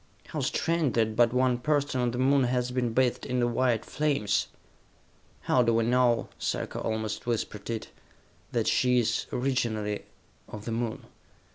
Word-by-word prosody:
"How - - -4
strange 165 -5 0
that 110 -1 +1
but 120 0 +4
one 125 -1 +2
person 140 -1 0
on 125 - +1
the 120 - -4
Moon 135 +1 +3
has 125 0 0
been 125 -2 0
bathed 125 +1 +1
in 125 - -1
the 120 - +2
white 120 -1 +1
flames!" 145 -9 0 0.9
"How 125 - +3
do 115 -1 +2
we 115 - +3
know," 120 -1 +3
Sarka - - -2
almost 110 +1 -3
whispered 110 -3 -3
it, 115 -1 -4 0.6
"that - - 0
she 125 0 +3
is, 120 -1 +1
originally, 115 -5 -1 0.4
of 105 0 -9
the 115 - -3
Moon? 115 0 -3
120 Hz, 160 wpm, -28 LUFS, 115-130 Hz, 0.9 s, but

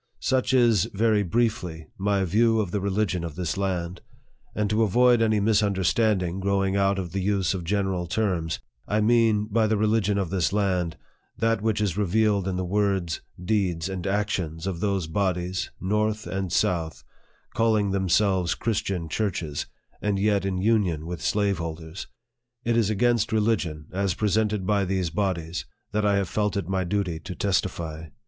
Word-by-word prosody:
Such 130 -1 +1
is, 120 -7 +4
very 110 0 +3
briefly, 90 -5 -1
my 100 0 +1
view 110 +5 +3
of 100 -5 -1
the 100 - -1
religion 95 -2 0
of 80 -3 -5
this 90 -3 -2
land; 90 -2 -2 0.5
and 105 -1 0
to 110 +1 +2
avoid 120 +3 +4
any 110 -2 +3
misunderstanding, 100 -2 +1
growing 95 0 +1
out 100 0 +2
of 90 -3 -4
the 95 - -2
use 95 -1 +1
of 90 -3 -4
general 95 -1 -1
terms, 85 -4 -1 0.3
I 105 - +1
mean, 110 -1 +3
by 110 +1 +1
the 110 0 +1
religion 105 -1 +2
of 95 -3 -1
this 90 -4 +1
land, 95 -5 0 0.4
that 115 -1 +1
which 110 -1 0
is 105 -2 0
revealed 105 0 +2
in 95 - -1
the 90 0 -2
words, 95 -3 0 0.2
deeds, 90 -3 0
and 95 -1 -4
actions, 95 -5 -1
of 95 -3 -3
those 100 -2 0
bodies, 90 +1 -1
north 105 +2 0
and 95 -2 -3
south, 80 -2 0 0.5
calling 110 -3 +2
themselves 95 -2 +2
Christian 100 -6 -2
churches, 80 -5 -2 0.3
and 105 -1 0
yet 100 -1 +1
in 95 -1 -1
union, 95 -6 +1
with 85 0 -5
slaveholders. 85 -4 -2 0.6
It 120 0 +1
is 115 -3 +2
against 115 +1 +2
religion, 105 -9 0
as 95 -2 0
presented 105 -1 0
by 100 0 +2
these 95 -3 -1
bodies, 90 -3 -2 0.2
that 105 +1 +1
I 100 - +3
have 100 -2 0
felt 105 +2 -1
it 100 - -2
my 95 -1 0
duty 90 -3 -1
to 90 +3 -7
testify. 85 -5 -2
100 Hz, 165 wpm, -25 LUFS, 90-105 Hz, 0.6 s, is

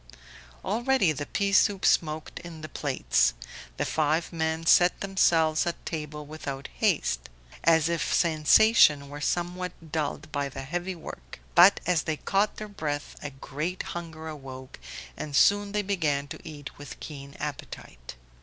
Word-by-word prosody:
Already 235 -2 +2
the 145 -1 -4
pea 200 -1 -1
soup 195 0 +4
smoked 155 -1 +1
in 170 -2 -10
the 155 - -6
plates. - - +1 0.4
The - - 0
five 155 +2 0
men 160 0 -1
set 175 +2 +5
themselves 165 -5 +2
at 170 - -4
table 150 -2 -5
without 140 -2 -6
haste, - - 0 0.3
as 160 -1 +4
if 170 -1 -1
sensation 155 -2 +5
were 145 +1 -8
somewhat 175 0 -3
dulled 155 0 -3
by 140 -1 -2
the 135 0 -7
heavy 175 +6 -3
work; 165 - -10
but 180 +3 +7
as 180 -3 +2
they 155 -1 -2
caught 200 +6 0
their 215 - -6
breath 150 -8 -4
a 145 - -4
great 150 +6 -4
hunger 165 -2 -7
awoke, 135 -4 -9 0.4
and 145 -2 -5
soon 205 +5 +4
they 210 0 0
began 155 -8 0
to - - -7
eat 150 -5 -9
with 145 - -9
keen 140 -2 -9
appetite. 140 - -7
160 Hz, 150 wpm, -27 LUFS, 145-180 Hz, 0.4 s, but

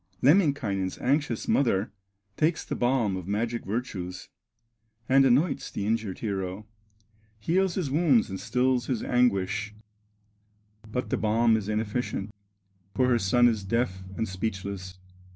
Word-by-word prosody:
Lemminkainen's 135 - +2
anxious 135 -3 0
mother 110 -7 +2 0.4
Takes 160 +5 +1
the - - -4
balm 120 -5 +1
of 95 -1 -6
magic 115 +3 -1
virtues, 95 -5 -5 0.8
And 135 +1 +5
anoints 135 +6 +2
the 100 - -4
injured 110 -3 -1
hero, 95 -1 -4 0.7
Heals 180 - +1
his 165 -8 -2
wounds 145 -6 +3
and 95 -1 -6
stills 125 -1 +1
his 125 -5 -1
anguish; 105 -3 +1 1.2
But 125 +2 -3
the - - +1
balm 115 +1 +3
is 105 -2 -2
inefficient, 105 -1 -2 0.6
For 130 +2 +3
her 120 -1 +3
son 120 +5 +4
is 110 -4 0
deaf 95 -2 -1 0.2
and 110 - -1
speechless. 95 -1 -5
115 Hz, 130 wpm, -27 LUFS, 100-130 Hz, 1.2 s, And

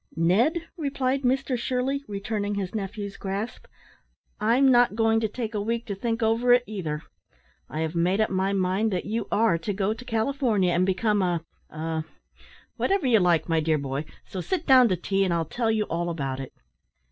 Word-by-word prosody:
"Ned," 235 - +2
replied 275 -3 -1
Mr 265 0 +1
Shirley, 255 +3 -1
returning 205 0 -3
his 195 -2 -3
nephew's 200 -1 -5
grasp, 200 +4 -5 0.7
"I'm 250 +5 +4
not 245 -3 +4
going 225 0 +3
to 220 - 0
take 225 +1 -5
a 210 - -1
week 230 +2 -2
to 210 - -4
think 230 +3 -2
over 230 +2 +4
it 245 0 +4
either. 160 -9 -4 0.7
I 155 - -3
have 160 0 -2
made 175 +4 +1
up 215 - +1
my 190 +1 +1
mind 195 +3 +1
that 180 -2 -2
you 220 0 -2
are 210 -6 +3
to 185 +5 -3
go 195 +2 0
to 230 +3 -10
California, 225 -5 +1
and 180 +2 +2
become 205 +2 +1
a 175 -3 0 0.3
a 160 0 -3 0.7
whatever 390 -6 +1
you 235 -4 +5
like, 175 -3 +2
my 165 -1 +2
dear 155 0 +1
boy; 140 +1 -3 0.2
so 185 - -5
sit 355 - -2
down 260 -3 +7
to 185 - +2
tea, 195 +3 0
and 185 - 0
I'll 165 -1 0
tell 225 +8 -1
you 220 -1 +2
all 175 -2 -2
about 135 -5 -3
it." 135 - -6
210 Hz, 195 wpm, -26 LUFS, 180-235 Hz, 0.7 s, down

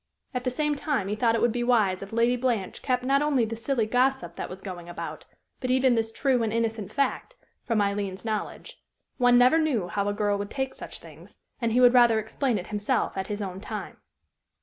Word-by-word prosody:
At 250 0 -3
the - - +2
same 300 +4 0
time 280 -9 -1
he 210 - -1
thought 230 +1 +2
it 230 - 0
would 240 - +3
be 240 +1 -2
wise 215 -7 +2
if 195 - -8
Lady 235 +2 +2
Blanche 240 -6 -2
kept 250 -2 0
not 275 +2 +2
only 285 -5 +2
the 225 +1 -4
silly 235 0 0
gossip 250 -6 +1
that - - -5
was 185 - -8
going 180 -3 -8
about, 175 - -7 0.3
but 255 - -3
even 260 0 +4
this 225 -1 0
true 255 +1 +1
and 225 -1 0
innocent 225 -2 -2
fact, 280 - -1 0.3
from 230 -4 +1
Aileen's 200 0 -3
knowledge. 225 - -4 0.4
One 245 -1 +5
never 255 +6 +5
knew 250 - 0
how 200 +3 -1
a - - -1
girl 205 -1 0
would 200 0 -4
take 265 +1 -3
such - - -8
things, - - -15 0.2
and 230 -1 +1
he 245 - +3
would 245 -1 +7
rather 240 -3 +6
explain 225 +2 -1
it 180 - -5
himself 205 0 0
at 190 -1 -3
his 205 0 -3
own 190 -1 -5
time. - - -6
230 Hz, 220 wpm, -26 LUFS, 205-255 Hz, 0.4 s, would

